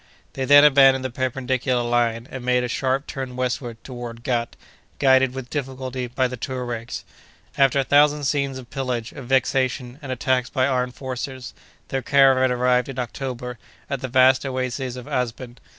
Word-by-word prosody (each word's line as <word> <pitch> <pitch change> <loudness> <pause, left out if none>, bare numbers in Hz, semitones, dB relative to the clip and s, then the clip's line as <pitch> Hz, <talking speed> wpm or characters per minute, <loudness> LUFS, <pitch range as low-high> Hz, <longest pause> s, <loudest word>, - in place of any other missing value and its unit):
They 135 - -2
then 145 +2 +8
abandoned 135 -2 +6
the 130 - -3
perpendicular 130 0 -1
line, 120 0 0
and 130 -2 -6
made 125 0 +2
a - - -1
sharp 130 +3 -1
turn 130 -2 -6
westward 125 -2 -3
toward 120 -2 -8
Ghât, 120 -2 -1 0.4
guided, 130 -1 +4
with 130 -2 -7
difficulty, 130 -2 -4
by 130 +2 0
the 125 - -6
Touaregs. 120 -2 -5 0.5
After 135 0 +3
a - - +2
thousand 145 +2 +4
scenes 140 -1 0
of 125 -2 -11
pillage, 125 -4 -3
of 130 - -10
vexation, 130 0 0
and 135 -3 -6
attacks 130 -1 0
by 130 -2 +1
armed 125 -2 -1
forces, 130 0 -6 0.4
their 135 - -1
caravan 130 -1 +4
arrived, 125 +1 +2
in 135 - -7
October, 125 -1 -5 0.3
at 140 -2 -2
the 130 - -3
vast 130 +1 +4
oasis 130 -1 -3
of 125 -1 -8
Asben. 125 0 -4
130 Hz, 165 wpm, -23 LUFS, 125-135 Hz, 0.5 s, then